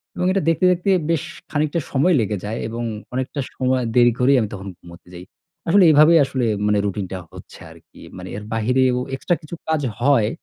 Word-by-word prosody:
এবং 180 - -2
এটা 195 - +1
দেখতে, 165 +3 +1
দেখতে 180 +2 -1 0.2
বেশ 165 -3 0 0.3
খানিকটা 155 +2 0
সময় 145 +7 +2
লেগে 105 -1 -2
যায় 110 +2 -4
এবং 115 +1 -5 0.3
অনেকটা 130 +3 -3 0.2
সময় 130 -1 0
দেরি 120 -1 +5
করেই 130 +2 +4
আমি 105 - -2
তখন 100 0 -8
ঘুমোতে 85 0 -16
যাই। 90 0 -9 0.4
আসলে 190 +3 +5
এইভাবেই 155 +2 +6
আসলে 130 -2 -2 0.2
মানে 105 0 +2
রুটিনটা 95 -2 -4
হচ্ছে - - -13
আরকি। - - -18 0.2
মানে - - -8
এর 105 - -8
বাহিরেও 125 +3 +1 0.2
extra 175 +6 -1
কিছু 155 +3 -9
কাজ 160 -2 0 0.2
হয়। 120 -5 +3
130 Hz, 185 wpm, -20 LUFS, 110-155 Hz, 0.4 s, এইভাবেই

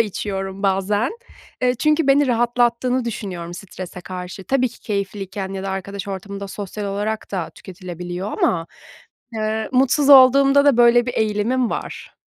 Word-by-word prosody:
içiyorum 195 -2 -3
bazen. 200 +4 +1 0.5
Eee, 250 0 +3
çünkü 305 +3 +2
beni 275 +1 +4
rahatlattığını 240 +1 +1
düşünüyorum 185 -7 -5
strese 185 -1 -8
karşı. 185 +1 -7
Tabii 255 +3 +1
ki 235 - -17
keyifliyken 195 -2 -4
ya 190 0 -5
da 195 - -3
arkadaş 200 +2 -5
ortamında 200 +1 -6
sosyal 205 +1 -6
olarak 205 +2 -3
da 180 -4 -3
tüketilebiliyor 180 +1 -7
ama, 165 -1 0 0.7
eee, 220 0 -2
mutsuz 270 +3 +3
olduğumda 275 +1 +7
da 280 -4 +5
böyle 240 0 +5
bir 245 - -3
eğilimim 220 +3 0
var. - - -6
210 Hz, 140 wpm, -21 LUFS, 190-245 Hz, 0.7 s, olduğumda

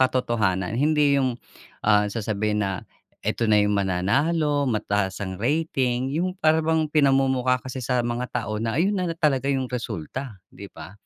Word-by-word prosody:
makatotohanan 110 -7 0
hindi 145 +2 +3
yung, 130 -3 0 0.5
ah, 105 -1 +4
sasabihin 105 -1 -1
na, 95 -2 -2 0.4
"Eto 115 -2 0
na 105 - +5
yung 105 0 +3
mananalo, 140 - +1
mataas 100 -4 -1
ang 95 0 -6
rating," 130 -2 0
yung 180 +4 -1
para 160 -3 +3
bang 160 0 +1
pinamumukha 135 -3 +3
kasi 130 +1 -7
sa 125 0 0
mga 120 +1 -2
tao 110 -3 -3
na 115 +2 -2
ayun 190 +6 +2
na 180 -2 -1
la 165 - -5
talaga 140 -4 +1
yung 135 -2 +1
resulta, 115 - -5 0.2
di 100 0 -10
ba? - - -11
125 Hz, 165 wpm, -24 LUFS, 105-145 Hz, 0.5 s, na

